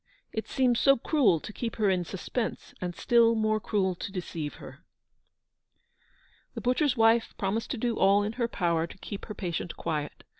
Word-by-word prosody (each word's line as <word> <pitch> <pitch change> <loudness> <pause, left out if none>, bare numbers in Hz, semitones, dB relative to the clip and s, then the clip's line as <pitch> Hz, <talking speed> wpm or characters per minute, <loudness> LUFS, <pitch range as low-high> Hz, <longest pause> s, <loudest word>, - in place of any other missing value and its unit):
it 220 - -3
seems 250 -3 +2
so 275 0 +5
cruel 235 - +3
to 210 - -9
keep 230 +1 -4
her 215 -2 +1
in 185 -2 +2
suspense, 205 +6 -4
and 175 -1 -3
still 230 +1 +4
more 215 -1 +1
cruel 195 -3 0
to 180 - -6
deceive 170 -5 -5
her." - - -12 1.7
The - - -4
butcher's 255 +2 +1
wife 225 +1 +3
promised 210 +4 -1
to 260 - -2
do 235 0 -1
all 200 +1 +5
in 210 - -2
her 235 - +3
power 170 -6 0
to - - -13
keep 200 +1 -7
her 210 - -7
patient 175 -2 -4
quiet. 150 -3 -3
215 Hz, 180 wpm, -28 LUFS, 180-235 Hz, 1.7 s, so